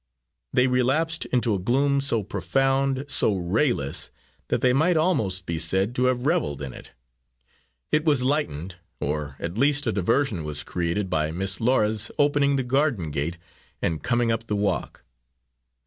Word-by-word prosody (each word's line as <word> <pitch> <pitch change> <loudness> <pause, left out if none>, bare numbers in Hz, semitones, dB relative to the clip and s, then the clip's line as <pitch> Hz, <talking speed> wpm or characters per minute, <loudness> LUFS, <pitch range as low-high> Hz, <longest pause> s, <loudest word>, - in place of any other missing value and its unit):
They 125 - +3
relapsed 135 +6 +1
into 120 -3 0
a 100 - -1
gloom 140 +7 +1
so 115 -6 +1
profound, 135 +4 0
so 110 -7 +3
rayless, 90 - -1 0.4
that - - -1
they 125 -1 +3
might 160 +5 +3
almost 110 - +1
be 85 -1 -3
said 95 +7 +1
to 125 +1 0
have 125 0 0
reveled 145 - 0
in 65 -2 -6
it. - - -11 1.0
It 150 0 +2
was 145 -5 +2
lightened, 95 - -2 0.2
or 75 -1 -3
at 85 +6 -5
least 145 +2 +3
a 110 - +1
diversion 105 - 0
was 75 -1 -1
created 90 +3 -2
by 80 -4 0
Miss 95 +5 0
Laura's 110 -3 +1
opening 145 -1 +2
the 135 - 0
garden 125 - 0
gate 75 +5 -2 0.4
and 80 -2 -2
coming 120 -1 +1
up 115 0 -3
the 105 - -1
walk. 100 0 -2
115 Hz, 160 wpm, -24 LUFS, 90-140 Hz, 1.0 s, They